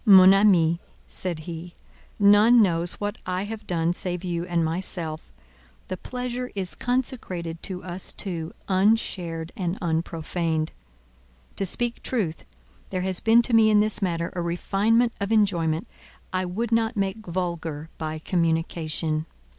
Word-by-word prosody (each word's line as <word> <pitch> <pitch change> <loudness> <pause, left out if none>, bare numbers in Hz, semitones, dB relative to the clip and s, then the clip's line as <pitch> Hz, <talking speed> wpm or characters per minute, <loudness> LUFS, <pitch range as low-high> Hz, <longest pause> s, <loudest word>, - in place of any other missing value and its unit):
"Mon 190 -3 +9
amie," 175 -5 +4 0.3
said 175 -4 -4
he, 170 +1 -8 0.4
"none 210 +4 +6
knows 175 -4 +2
what 205 0 -4
I 185 +1 -1
have 215 0 -7
done 170 -1 +1
save 180 0 -3
you 175 -1 -2
and 170 -2 +1
myself: 160 -1 -3 0.6
the 185 - -2
pleasure 250 +4 -4
is 190 -3 -2
consecrated 225 -10 -3
to 185 -2 -4
us 180 0 -5
two, 170 -4 -4 0.2
unshared 185 -5 +1
and 180 0 -2
unprofaned. 165 -1 -1 0.9
To 195 - +2
speak 240 +5 0
truth, 195 -11 -2 0.4
there 185 -1 -2
has 185 -1 +2
been 230 +1 +5
to 240 - 0
me 220 -1 +6
in 210 -1 +5
this 215 0 +2
matter 170 -3 -1
a 175 - -1
refinement 210 +7 +1
of 200 +1 -2
enjoyment 175 -6 +2 0.5
I 185 0 0
would 215 +6 -3
not 225 0 +1
make 200 +2 -2
vulgar 170 -3 -3
by 155 -1 -3
communication. 160 -1 0
180 Hz, 140 wpm, -25 LUFS, 165-210 Hz, 0.9 s, Mon